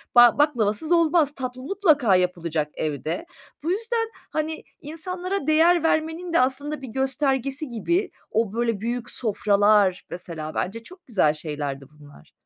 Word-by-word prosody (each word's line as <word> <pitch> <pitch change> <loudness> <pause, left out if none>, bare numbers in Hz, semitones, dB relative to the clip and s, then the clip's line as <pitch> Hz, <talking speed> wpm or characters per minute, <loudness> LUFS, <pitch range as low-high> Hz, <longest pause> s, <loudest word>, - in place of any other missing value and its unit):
Ba 240 -1 +8
baklavasız 285 -1 +1
olmaz. 330 -3 +3
Tatlı 255 -1 -5
mutlaka 295 - +3
yapılacak 170 -4 0
evde. 155 - -3 0.4
Bu 335 - 0
yüzden, 455 +2 -1 0.2
hani, 315 +1 -3 0.2
insanlara 365 +5 -4
değer 325 +2 +4
vermenin 325 +2 0
de - - +5
aslında 275 +4 -1
bir 265 - -7
göstergesi 270 +2 -1
gibi 345 - -1 0.2
o 220 -2 0
böyle 230 -3 -1
büyük 240 +1 -3
sofralar, 205 -3 +2
mesela, 160 -3 -7
bence 225 +5 -3
çok 365 +6 -15
güzel 185 - +3
şeylerdi 145 -3 -5
bunlar. 145 - -17
255 Hz, 135 wpm, -24 LUFS, 200-320 Hz, 0.4 s, Ba